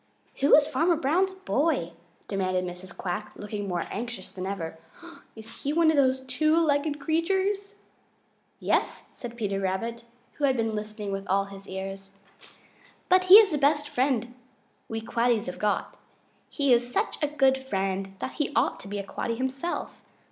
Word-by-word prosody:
"Who 280 - +6
is 295 - +5
Farmer 320 +4 +2
Brown's 350 +6 +1
boy?" 300 - 0 0.4
demanded 185 -2 -1
Mrs. 180 +2 -9
Quack, 195 +4 -4
looking 205 -1 -5
more 175 -2 -1
anxious 235 -3 -5
than 185 0 -5
ever. 165 -5 -5 0.6
"Is 225 +1 -11
he 285 - -1
one 330 0 +5
of - - 0
those 260 -1 +3
two 310 +5 +1
legged 295 -2 +1
creatures?" 385 +6 0 0.8
"Yes," - - 0
said 235 -1 -8
Peter 200 -4 -1
Rabbit, 230 +5 -2 0.4
who 290 - +3
had 265 -2 +2
been 225 -1 0
listening 210 -1 -4
with 195 0 -4
all 195 +1 +2
his 195 0 -12
ears, 195 +1 -7 0.9
"but 370 0 +5
he 370 +1 +10
is 420 -3 +9
the 300 - 0
best 295 +1 +3
friend 245 -3 0 0.6
we 225 0 -3
Quaddies 235 -1 +1
have 180 - -6
got. 210 -1 -1 0.5
He 280 -4 +2
is 240 +1 +2
such - - -1
a 295 - +2
good 270 -2 +3
friend 195 -5 -2
that 260 - -5
he 295 - 0
ought - - +2
to - - -10
be 205 +1 -4
a 200 - -4
Quaddy 230 +3 -3
himself. 265 +6 -3
240 Hz, 170 wpm, -27 LUFS, 195-295 Hz, 0.9 s, he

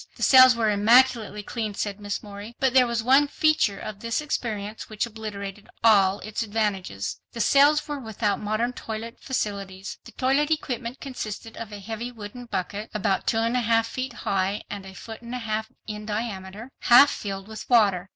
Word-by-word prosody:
"The - - -5
cells 255 -2 +8
were 225 -2 +2
immaculately 220 0 +4
clean," 215 -2 -4
said 205 0 -3
Miss 205 -1 -4
Morey, 205 +2 -9
"but 265 -2 +2
there 255 -2 +6
was 235 -1 -1
one 270 +4 +5
feature 300 -9 +2
of 210 0 -7
this 230 +1 -1
experience 220 -8 -4
which 215 +1 -1
obliterated 210 -3 -7
all 200 -4 +5
its 215 +1 -4
advantages. 205 - -2 0.2
The 235 - -7
cells 285 +6 +4
were 295 -1 -4
without 220 -3 -1
modern 215 +4 -1
toilet 225 0 -6
facilities. 200 -6 -4
The - - -12
toilet 275 +3 +1
equipment 255 -5 -2
consisted 225 -4 -6
of 230 -2 -7
a 205 - -6
heavy 225 +4 -5
wooden 230 +2 -9
bucket, 205 0 -4
about 195 -2 0
two 225 - +2
and 230 +2 +1
a 250 - +2
half 230 0 +2
feet 255 +2 -4
high 195 +1 0
and 200 -1 -6
a 190 - -11
foot 225 +4 -9
and 240 +1 -6
a - - -1
half 220 -2 -3 0.2
in 210 -1 -6
diameter, 210 +1 -5
half 245 +4 +7
filled 195 -1 -5
with 220 -1 -9
water. 200 -6 +3
220 Hz, 185 wpm, -25 LUFS, 205-240 Hz, 0.2 s, cells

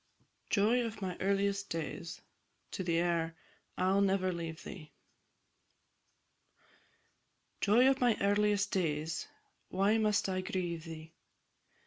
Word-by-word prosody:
JOY 230 +4 +3
OF 225 -2 -5
MY 185 -2 -2
EARLIEST 200 +1 0
DAYS. 165 +1 -5 0.7
AIR 170 -1 +1 0.4
"I'll 190 +2 +3
never 190 -2 +2
leave 165 -1 -5
thee." 155 -6 -10 2.7
Joy 230 +5 +5
of 270 -1 +3
my 240 -3 +4
earliest 205 0 +2
days, 155 -3 -1 0.4
Why 200 +4 +2
must 210 -2 +2
I 185 -1 -1
grieve 180 -4 -3
thee? 160 -1 -9
190 Hz, 100 wpm, -33 LUFS, 170-205 Hz, 2.7 s, Joy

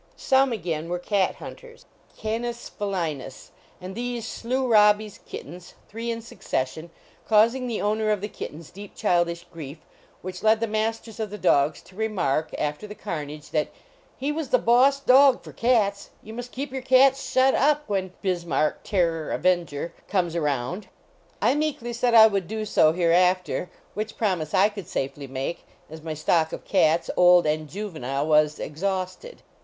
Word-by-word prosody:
Some 265 0 +3
again 165 -6 -3
were 180 - -1
cat 190 +1 0
hunters, 475 -1 -12 0.3
Canis 235 +2 -4
fc 205 -1 -4
linns, 155 -8 -4 0.3
and 185 +1 -7
these 240 +1 -4
slew 255 +4 -2
Robbie 210 -2 +5
s 210 - -12
kittens, 175 +4 -9
three 230 +2 -5
in 230 -1 -3
succession, 155 - -4 0.4
causing 230 +4 +4
the 230 -3 -2
owner 215 +1 0
of 210 -1 +1
the 205 - -4
kittens 160 -6 -9
deep 200 +2 -11
childish 175 -1 0
grief, 155 -2 -8 0.5
which 185 0 -6
led 220 0 +4
the 230 - 0
masters 220 +1 -3
of 215 -1 -2
the 210 - -7
dogs 145 -4 +2
to 185 - -19
remark, 185 -9 -1
after 150 +7 -3
the 210 - -9
car 170 -7 -4
nage, 150 +1 -10
that 155 -1 +1 0.3
" - - -33
he 280 +3 -2
was 305 -3 -4
the 255 - +5
boss 255 +4 +4
dog 270 0 +5
for - - -11
cats; 215 -5 +1
you 220 - -10
must 245 +1 -7
keep 265 0 -5
your 265 - -3
cats 265 +1 +5
shut 260 +1 +4
up 295 +1 +2
when 190 -3 -2
(Bis 180 -3 0
marck, 155 -2 0
Terror, 165 -5 0
Avenger) 170 -3 0
comes 175 -4 0
around." 150 - -2 0.6
I - - +4
meekly 290 -5 -2
said 240 0 +1
I 220 -1 +10
would 200 -5 +1
do 220 0 -3
so, 155 -6 +4
hereafter, 180 +2 +2 0.2
which 215 +2 -5
promise 180 -8 -1
I 195 +2 +5
could 200 -5 -9
safely 140 -4 -4
make, 135 +5 -4 0.3
as 160 0 -9
my 160 0 -5
stock 160 +1 +1
of - - -7
cats, 165 -3 +2
old 180 -1 +6
and 155 0 -1
juvenile, 155 -9 -3
was 150 -1 +3
exhausted. 190 - -4
200 Hz, 175 wpm, -25 LUFS, 165-230 Hz, 0.6 s, I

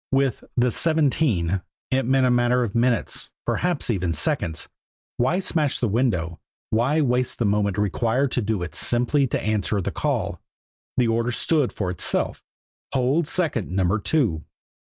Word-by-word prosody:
With 135 -3 +1
the 125 0 +3
"seventeen" 130 - +1 0.3
it 130 -2 +1
meant 130 0 +3
a 125 - +3
matter 120 0 +3
of 110 -4 -3
minutes, 120 0 0 0.2
perhaps 175 -8 0
even 90 -5 -1
seconds. 80 +1 -1 0.5
Why 130 +9 +2
smash 155 -6 0
the 120 - 0
window? 95 -8 0 0.3
Why 130 +8 +2
waste 125 -2 0
the 120 - 0
moment 100 -1 +1
required 115 +6 +1
to 125 - 0
do 105 -4 -1
it 85 -3 -6
simply 125 - +2
to - - -1
answer 105 -1 0
the 95 - -2
call? - - -2 0.6
The 125 - +3
order 115 +1 +1
stood 145 +3 +1
for 95 -4 -3
itself 90 - -1 0.5
"Hold 135 +5 +1
second 150 - -1
Number 95 +2 +1
Two." 105 - 0
120 Hz, 155 wpm, -23 LUFS, 100-135 Hz, 0.6 s, the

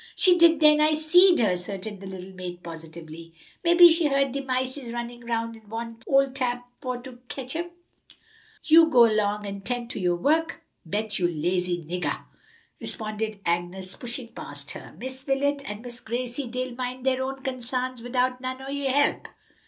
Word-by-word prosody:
"She 365 -1 +5
did 335 -1 +6
den, 300 -1 +6
I 305 0 +4
seed 350 +4 +6
her," 215 -5 +3
asserted 195 +3 -4
the 195 - -9
little 190 0 -8
maid 180 -1 -7
positively. 165 0 -9 0.3
"Mebbe 345 0 +4
she 325 -1 +3
heerd 275 -1 +2
de 275 +2 -2
mices 260 -1 -2
runnin' 240 0 -5
'round 230 -1 -2
an 220 -2 -17
want 230 +1 -6
ole 275 -1 +4
Tab 250 -2 -1 0.2
for 255 -3 -3
to 245 0 -11
ketch 265 +2 -4
'em." 345 +1 -2 0.9
"You 325 +1 +7
go 255 -7 +5
'long 210 -2 +2
and 200 0 -6
'tend 245 0 -3
to - - -5
yo' 180 -2 +2
wuk. 320 - +1 0.2
Bet, 210 +5 -2
you 175 - +3
lazy 175 +1 -1
niggah," 180 +3 -2 0.6
responded 215 -1 -4
Agnes, 175 +2 -2
pushing 245 0 -6
past - - -8
her. - - -10
"Miss 260 +1 -5
Wilet 280 +1 +1
an 210 +2 -6
Miss 245 -1 -7
Gracie 245 +3 -3
dey'll 255 +1 -3
min' 250 +1 -4
dere 260 0 +1
own 265 0 -4
consarns 255 -1 -3
widout 250 +1 0
none 255 0 -4
o' 270 - -7
yo' 280 -1 -1
help." 285 +2 +2
245 Hz, 175 wpm, -26 LUFS, 205-270 Hz, 0.9 s, You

